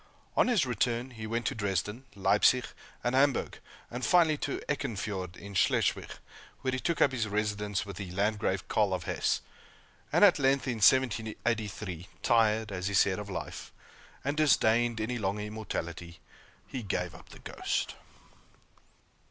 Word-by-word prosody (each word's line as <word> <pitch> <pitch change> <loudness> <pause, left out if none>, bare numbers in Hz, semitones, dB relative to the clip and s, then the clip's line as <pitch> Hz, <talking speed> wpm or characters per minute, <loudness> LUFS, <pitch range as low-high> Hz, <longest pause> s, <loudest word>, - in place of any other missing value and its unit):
On - - +4
his 230 - +3
return, 120 +1 -1
he 110 -2 -7
went 115 +1 -2
to - - 0
Dresden, 105 +4 -2
Leipzig, 100 +6 +4 0.4
and 120 - 0
Hamburg, 135 0 +2 0.3
and 125 +2 -5
finally 170 -4 +4
to 140 - -3
Eckernfiorde, 105 -10 -3
in 100 0 -9
Schleswig, 95 - +2 0.5
where 130 - 0
he 130 - -1
took 170 +4 +2
up 135 - +3
his 120 -4 -1
residence 105 -1 -1
with 100 - -8
the 95 -3 -5
Landgrave 100 +3 0
Karl - - +2
of - - -5
Hesse; - - 0 0.7
and - - +6
at 180 -6 +5
length, 135 0 +2
in 120 -3 -1
1783, 110 -5 +1 0.2
tired, 110 -2 +3
as 90 0 -3
he 100 - -1
said, 95 +1 +3
of 105 -1 -7
life, 95 - -6 0.5
and 140 +2 -1
disdaining 120 -6 +3
any 120 +3 -2
longer 100 0 -1
immortality, 85 -6 -5 0.5
he 130 - -5
gave 90 -4 -2
up - - -14
the - - -12
ghost. - - -2
110 Hz, 150 wpm, -30 LUFS, 100-125 Hz, 0.7 s, and